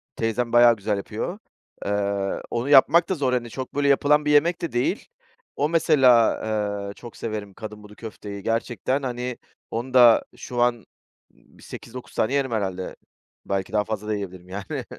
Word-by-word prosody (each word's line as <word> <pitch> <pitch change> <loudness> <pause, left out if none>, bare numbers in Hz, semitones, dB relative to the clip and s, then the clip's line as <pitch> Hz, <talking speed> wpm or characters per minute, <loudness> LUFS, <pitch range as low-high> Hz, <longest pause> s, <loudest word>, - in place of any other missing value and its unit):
Teyzem 115 +1 -1
bayağı 120 -1 +7
güzel 105 0 -2
yapıyor. 110 - -5 0.5
Iıı, 100 -1 -1
onu 120 +4 -2
yapmak 155 +5 +6
da 190 - +1
zor, 130 -4 0
hani, 120 -2 -1
çok 130 +3 -7
böyle 145 0 +1
yapılan 150 +2 +3
bir 150 - +2
yemek 165 +4 +3
de 170 - -3
değil. 120 +1 -1 0.5
O 145 +2 0
mesela, 135 -8 +5 0.6
ııı, 100 - -6
çok 120 +1 -12
severim 105 -3 -5
kadınbudu 105 -1 -10
köfteyi. 105 -3 -8
Gerçekten, 120 +4 -1
hani, 125 -1 -3 0.3
onu 125 +3 -4
da 120 -3 +7
şu 120 -1 -4
an, 120 0 +4
ımm, 110 - -19 0.7
bir - - -17
8-9 125 +1 -10
tane 120 +5 +1
yerim 135 -3 0
herhâlde. 95 -4 -3 0.5
Belki 100 +2 -3
daha 105 -1 +2
fazla 105 -1 -5
da 110 - 0
yiyebilirim, 90 -2 -7
yani. 95 0 -5
120 Hz, 170 wpm, -24 LUFS, 105-130 Hz, 0.7 s, bayağı